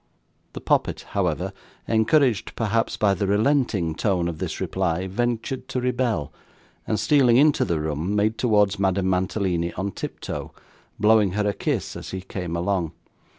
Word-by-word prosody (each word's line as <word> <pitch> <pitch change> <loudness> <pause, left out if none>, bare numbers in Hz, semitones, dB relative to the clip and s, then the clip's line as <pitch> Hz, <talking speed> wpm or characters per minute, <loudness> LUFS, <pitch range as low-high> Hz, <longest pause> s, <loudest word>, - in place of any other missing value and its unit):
The - - -7
poppet, - - +1
however, - - -1 0.3
encouraged 115 +1 +2
perhaps 115 0 0
by 100 -2 +3
the 100 0 -1
relenting 105 - +1
tone 90 -1 0
of 80 -2 -5
this - - -4
reply, 95 -1 -1
ventured 120 +5 -2
to 125 - -2
rebel, 125 - -1 0.5
and, 110 - 0
stealing 130 -5 +4
into 145 +2 +4
the 85 -2 -1
room, 80 +6 -2
made 105 +2 +1
towards 105 -4 +2
Madame 95 -1 +1
Mantalini 90 -2 0
on 95 +2 -3
tiptoe, - - -6 0.5
blowing 105 -3 +4
her 105 +1 0
a 100 - +1
kiss - - -2
as - - -7
he 95 - -5
came 90 -3 -5
along. 85 -1 -1
100 Hz, 150 wpm, -24 LUFS, 90-115 Hz, 0.5 s, stealing